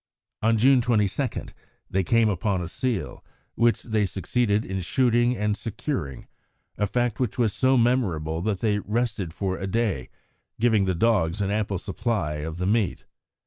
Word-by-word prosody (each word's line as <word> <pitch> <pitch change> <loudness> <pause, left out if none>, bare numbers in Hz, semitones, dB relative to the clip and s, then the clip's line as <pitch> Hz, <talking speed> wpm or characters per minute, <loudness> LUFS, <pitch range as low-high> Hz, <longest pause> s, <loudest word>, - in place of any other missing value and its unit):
On 115 +1 +3
June 130 +3 +5
22 115 +2 +1 0.6
they 95 0 0
came 115 +5 +3
upon 100 -1 0
a 85 - -4
seal, 120 +3 -3 0.3
which 120 0 +2
they 110 -3 0
succeeded 105 +2 0
in 95 0 -3
shooting 120 +5 +2
and 105 0 0
securing, 105 - -4 0.5
a 105 - 0
fact 120 0 -1
which 130 0 -1
was 115 -5 +2
so 130 0 +3
memorable 90 -11 +1
that 100 0 -1
they 105 -2 +1
rested 105 -5 -2
for 95 +2 -3
a 95 - -3
day, 100 - -1 0.5
giving 110 -4 +3
the 95 -1 0
dogs 95 -3 +2
an 100 -1 0
ample 105 -2 -1
supply 95 -6 -2
of 80 +2 -5
the 90 - -2
meat. 105 -1 0
105 Hz, 160 wpm, -25 LUFS, 95-120 Hz, 0.6 s, June